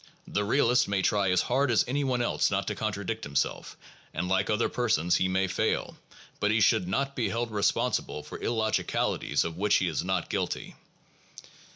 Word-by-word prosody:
The 105 - -1
realist 120 +2 +3
may 100 -1 0
try 100 -1 +2
as 90 -1 +3
hard 130 +2 +1
as 115 - +3
any 140 +3 0
one 125 -3 0
else - - +1
not - - -1
to - - -1
contradict 110 +1 -3
himself 70 -1 -2 0.4
and 90 +3 -2
like 95 +1 +1
other 105 +2 +2
persons 90 -9 +1
he 95 - +1
may 95 +1 +1
fail, 95 - -1 0.4
but 105 - +1
he 110 +1 +2
should 90 -3 +3
not 135 +8 -1
be 120 - 0
held 115 0 -2
responsible 100 -6 0
for - - -9
illogicalities 110 -2 0
of 80 0 -5
which 105 +2 +2
he 95 - +2
is 80 -4 -1
not - - -1
guilty. - - -3
105 Hz, 185 wpm, -28 LUFS, 95-120 Hz, 0.4 s, realist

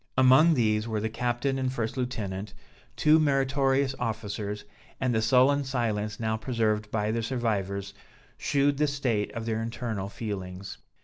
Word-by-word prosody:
Among 130 +6 +6
these 110 -3 +1
were 110 -2 -1
the 110 +1 -2
captain 125 +3 -1
and 130 -1 0
first 115 -4 -3
lieutenant, 105 -6 -4 0.4
two 155 - +5
meritorious 135 -2 +2
officers: 105 -3 -3 0.3
and 130 -2 +1
the 110 - +2
sullen 135 +4 +4
silence 110 -5 -2
now 110 -1 0
preserved 110 -2 0
by 105 0 0
the 115 +1 -1
survivors, 100 -5 -2 0.4
shewed 140 0 +1
the 150 - +3
state 125 -7 -1
of 115 -1 -5
their 110 -1 -1
internal 115 -4 -3
feelings. 100 -3 -6
115 Hz, 145 wpm, -28 LUFS, 105-130 Hz, 0.4 s, Among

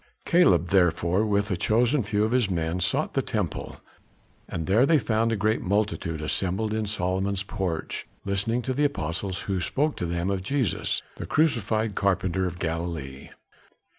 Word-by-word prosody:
Caleb 90 - +4
therefore 90 +2 +2
with 100 0 +1
a - - +2
chosen 120 +9 +2
few 105 -1 0
of 110 - 0
his 125 -5 +2
men 85 -1 -1
sought 90 - 0
the - - +2
temple; - - -3 0.7
and 80 - -3
there 110 +8 +4
they 165 - +5
found 115 -3 +1
a - - +1
great 110 +2 +1
multitude 95 -5 -1
assembled 95 +7 0
in 110 -1 -1
Solomon's 95 0 0
porch, 95 -5 -3 0.2
listening 100 +5 0
to 130 - -1
the 145 +3 +2
apostles 95 - -2
who 95 -2 -2
spoke 150 +9 0
to 90 - -2
them 85 +3 -1
of 95 -1 -1
Jesus, 125 - -1
the - - -6
crucified 110 -8 +1
carpenter 95 -2 0
of 90 -1 -6
Galilee. 80 -5 -4
100 Hz, 165 wpm, -26 LUFS, 90-110 Hz, 0.7 s, they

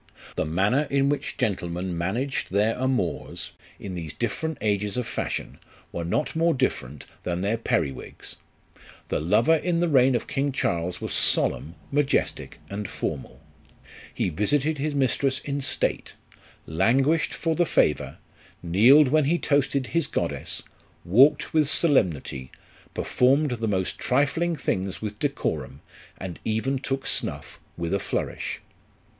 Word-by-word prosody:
The - - 0
manner 100 - +1
in 140 0 +2
which 145 - -2
gentlemen 90 -2 -2
managed 115 +11 -2
their 105 +3 +2
amours, 130 -9 -2 0.3
in 95 - -6
these 80 -4 -6
different 160 +6 -2
ages 105 0 0
of 125 - -1
fashion, - - -4 0.3
were 85 - -3
not 90 - -1
more 165 0 +3
different 75 - -2 0.2
than 90 0 -2
their 100 +4 +1
perriwigs. 80 - -3 0.7
The - - 0
lover 110 - +4
in 170 +1 0
the 175 - +2
reign 130 -4 +4
of 120 - -1
King 140 +1 -1
Charles 85 -8 -1
was - - -3
solemn, 80 +3 +1 0.2
majestic, 145 -1 0
and 100 0 -5
formal. 65 -3 -5 0.7
He - - -1
visited 140 - 0
his 150 +1 -1
mistress 135 0 +1
in 140 0 -3
state; - - -1 0.5
languished 130 - +2
for 165 -1 0
the 175 +1 +2
favour, 75 - +1 0.5
kneeled 120 - +6
when 155 +1 +3
he 165 +5 +2
toasted 140 -3 +1
his 165 +3 0
goddess, - - -3 0.4
walked 125 - +5
with 155 -3 +3
solemnity, 85 - +1 0.5
performed 135 +3 +2
the 115 -2 -2
most 95 -3 -1
trifling 145 +6 +1
things 95 - -2
with 105 -1 -5
decorum, 135 - -2 0.4
and 95 -3 -7
even 120 +5 0
took 135 0 -3
snuff - - -3 0.2
with 85 +1 -2
a 100 - +2
flourish. - - -3
125 Hz, 140 wpm, -25 LUFS, 95-140 Hz, 0.7 s, kneeled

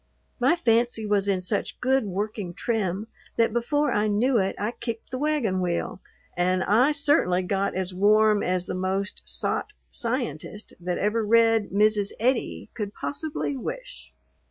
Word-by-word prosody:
My 260 +7 +4
fancy 235 -6 +2
was 205 -1 +1
in 190 -2 +1
such 180 - -2
good 265 -1 +2
working 200 -2 -4
trim 210 -3 -1 0.3
that 230 -1 +3
before 290 +4 +1
I 210 -1 +1
knew 230 +4 +2
it 190 0 0
I 210 +3 -1
kicked 230 -2 -6
the 255 - -3
wagon 275 -11 0
wheel, 180 +1 -2 0.3
and 185 +1 +1
I 245 +8 +4
certainly 285 - +2
got 195 +1 -1
as 185 0 -2
warm 210 +2 +4
as 180 0 0
the - - -4
most 190 +2 -2
"sot" 420 - -2 0.2
Scientist 230 - -3
that 180 0 -2
ever 215 +2 +1
read 225 0 +4
Mrs. 210 0 +2
Eddy 245 +2 -1
could 210 -3 -5
possibly 290 -1 -3
wish. - - -7
215 Hz, 155 wpm, -25 LUFS, 190-245 Hz, 0.3 s, My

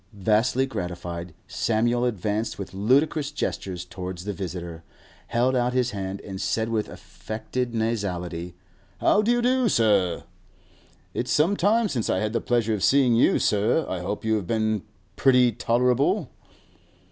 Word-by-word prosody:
Vastly 110 +6 +2
gratified, 90 -6 -5
Samuel 115 +6 0
advanced 110 -1 -2
with 95 -2 -7
ludicrous 140 - +2
gestures 95 - -4
towards 90 -1 -7
the 105 - -2
visitor, 85 -3 -6 0.4
held 125 +2 +1
out 125 0 +1
his 125 -1 +1
hand, 95 -1 -5
and 95 -2 -7
said 110 +4 0
with 110 -2 -1
affected 120 +2 -5
nasality, 90 -6 -2 0.4
'How 205 - +3
do 215 - -1
you 240 0 +2
do, 255 -1 +3
sir? 100 - +2 0.9
It's 125 - -2
some 165 +7 +3
time 215 +5 +2
since 120 - -2
I - - +2
had 110 +3 -1
the 115 - 0
pleasure 115 -2 +1
of 105 - -2
seeing 135 -3 +4
you, 115 - +4
sir. 105 +10 +2
I 95 - -3
hope 100 +5 -4
you 110 0 +2
have 95 -5 -5
been 110 -1 0 0.4
pretty 125 -2 +5
tolerable. 125 +4 +1
110 Hz, 150 wpm, -25 LUFS, 95-125 Hz, 0.9 s, pretty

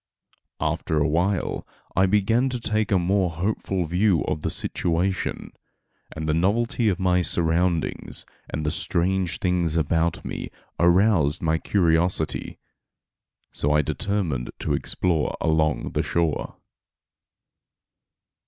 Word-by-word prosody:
After 80 - -1
a 75 - +3
while 85 +5 0 0.3
I 95 +1 +4
began 115 +6 +2
to 125 -1 -3
take 110 -2 -1
a 100 - +5
more 95 +1 +1
hopeful 95 +1 -2
view 90 +1 +2
of 75 - -2
the - - -1
situation, 90 +2 -1 0.6
and 80 0 -5
the 75 - +2
novelty 110 +6 +1
of 95 - -1
my 90 -1 +2
surroundings, 85 0 0 0.2
and 75 - -3
the 75 - +1
strange 90 0 0
things 90 -3 0
about 80 +1 0
me, - - -5 0.3
aroused 85 -4 +3
my 80 0 +1
curiosity. 85 -3 +1 0.9
So 75 +1 0
I 75 0 +3
determined 80 -6 -2
to - - -1
explore 85 -5 0
along 80 -1 +1
the - - 0
shore. 85 -3 -1
85 Hz, 120 wpm, -24 LUFS, 80-95 Hz, 0.9 s, a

